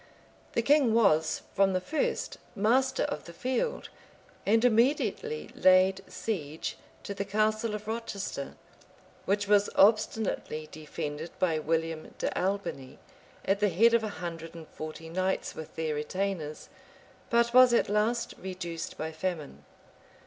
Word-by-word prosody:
The 230 - +1
king 275 -4 +4
was, 160 -8 +3
from 195 -1 +3
the 185 - +2
first, 295 +11 -2 0.2
master 260 +6 +2
of 285 - -3
the 170 - -10
field; 255 - -2 0.6
and 225 +3 +4
immediately 275 - +1
laid 185 +1 +4
siege 160 -8 -4 0.3
to 200 - -4
the 200 - -3
castle 215 +2 0
of 210 - -7
Rochester, 210 -10 -4 0.7
which 205 +1 +1
was 205 0 +4
obstinately 215 -6 +2
defended 150 +1 -5
by 165 -4 +1
William 160 0 -2
de - - -2
Albiney, 185 -9 -2 0.5
at 195 +1 +2
the 205 0 +3
head 225 +7 +4
of 235 -1 +4
a 215 - -2
hundred 165 -1 -6
and 160 -2 -9
forty 155 +1 -8
knights 185 +3 -1
with 160 - -9
their 160 -1 -1
retainers, 155 0 -3 0.6
but 235 -1 +3
was 255 0 +8
at 235 - +3
last, 225 +3 0
reduced 175 -3 -5
by 160 +1 -3
famine. 160 -2 -4
195 Hz, 135 wpm, -29 LUFS, 165-225 Hz, 0.7 s, was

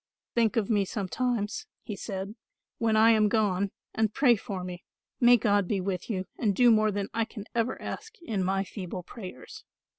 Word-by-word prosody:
"Think 230 -2 +2
of 215 -3 +2
me 205 -3 +3
sometimes," 225 - -2 0.2
he 210 - -5
said, 195 0 -5 0.5
"when 225 -1 +2
I 225 +1 +7
am 215 -2 +4
gone, 200 -3 +1 0.2
and 220 -1 +1
pray 255 -1 +5
for 200 -4 -5
me. 180 0 -7 0.4
May 245 0 +7
God 205 -4 +2
be 200 0 0
with 185 +1 -3
you 190 -4 -2
and 210 -5 +1
do 245 +2 +6
more 215 -1 +4
than 200 -1 -2
I 230 - +1
can 215 -2 -8
ever 235 +1 0
ask 445 +1 -7
in 210 - -1
my 195 +1 +1
feeble 185 -2 -6
prayers." 180 - -10
210 Hz, 185 wpm, -28 LUFS, 195-230 Hz, 0.5 s, I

